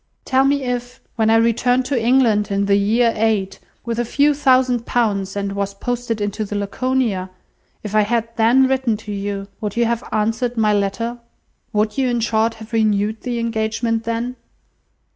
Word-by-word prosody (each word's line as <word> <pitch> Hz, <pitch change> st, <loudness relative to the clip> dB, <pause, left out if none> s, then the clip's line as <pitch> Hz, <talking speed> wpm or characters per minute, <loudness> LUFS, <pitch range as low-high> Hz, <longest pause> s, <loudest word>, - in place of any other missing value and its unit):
Tell 265 Hz, 0 st, +3 dB
me 280 Hz, 0 st, +1 dB
if, 245 Hz, 0 st, -4 dB, 0.2 s
when 220 Hz, -1 st, +2 dB
I 225 Hz, -, +5 dB
returned 245 Hz, +3 st, +2 dB
to 255 Hz, -4 st, -1 dB
England 230 Hz, -4 st, +3 dB
in 200 Hz, 0 st, 0 dB
the 200 Hz, 0 st, +3 dB
year 225 Hz, +4 st, +2 dB
eight, 210 Hz, -3 st, 0 dB, 0.3 s
with 235 Hz, 0 st, -2 dB
a -, -, +2 dB
few 285 Hz, +5 st, +2 dB
thousand 255 Hz, -4 st, +2 dB
pounds, 200 Hz, -5 st, 0 dB
and 200 Hz, -1 st, -2 dB
was 200 Hz, 0 st, -3 dB
posted 245 Hz, 0 st, -3 dB
into 205 Hz, +1 st, -2 dB
the 205 Hz, 0 st, -5 dB
Laconia, 205 Hz, -1 st, -1 dB, 0.5 s
if 210 Hz, -1 st, -6 dB
I 215 Hz, -, +5 dB
had 230 Hz, +2 st, 0 dB
then 245 Hz, +4 st, +4 dB
written 260 Hz, -4 st, 0 dB
to 215 Hz, 0 st, -9 dB
you, 200 Hz, 0 st, -4 dB
would 210 Hz, 0 st, -4 dB
you 235 Hz, -, +3 dB
have 235 Hz, +1 st, -1 dB
answered 225 Hz, +3 st, -1 dB
my 215 Hz, -1 st, +3 dB
letter? 220 Hz, +4 st, -1 dB, 0.5 s
Would 215 Hz, +3 st, 0 dB
you, 260 Hz, -2 st, +2 dB
in 240 Hz, -1 st, 0 dB
short, 225 Hz, 0 st, +1 dB
have 220 Hz, +1 st, -12 dB
renewed 215 Hz, -1 st, +1 dB
the 245 Hz, -2 st, -3 dB
engagement 230 Hz, 0 st, -1 dB
then?" 235 Hz, +2 st, -3 dB
225 Hz, 180 wpm, -20 LUFS, 210-245 Hz, 0.5 s, I